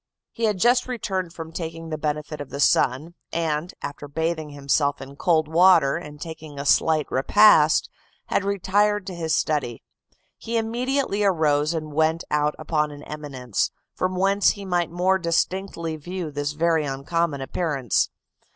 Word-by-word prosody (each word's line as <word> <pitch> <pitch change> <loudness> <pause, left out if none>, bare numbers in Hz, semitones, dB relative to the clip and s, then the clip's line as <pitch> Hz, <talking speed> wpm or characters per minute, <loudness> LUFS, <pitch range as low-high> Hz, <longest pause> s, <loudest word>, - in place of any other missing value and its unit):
He 230 - -2
had 210 -3 +1
just 245 +5 +3
returned 190 -8 -3
from 165 -1 -8
taking 165 -1 -6
the 155 - -2
benefit 150 0 -3
of 145 - -7
the 140 - -6
sun, 140 +3 +2 0.2
and, 165 0 -1
after 145 0 -6
bathing 160 +1 -2
himself 140 0 0
in 135 +1 -10
cold 160 0 +2
water, 165 -3 +5
and 150 -3 -7
taking 160 -2 -8
a 140 - -4
slight 155 +1 +3
repast, 155 +2 +5 0.4
had - - 0
retired 200 +1 +1
to 190 - -6
his 160 -3 -1
study. 145 -7 -1 0.6
He 230 +1 -2
immediately 235 -1 -1
arose, 155 -4 +2
and 155 -2 -5
went 160 +2 +1
out 150 0 +1
upon 150 -2 0
an 145 0 -10
eminence, 135 -7 -3 0.2
from 185 0 -2
whence 195 +2 +3
he 200 -1 -3
might 175 -2 0
more 185 +2 +1
distinctly 170 -1 -1
view 175 +1 -5
this 145 0 -3
very 165 0 +2
uncommon 145 +2 -1
appearance. 135 - 0
160 Hz, 155 wpm, -24 LUFS, 150-185 Hz, 0.6 s, water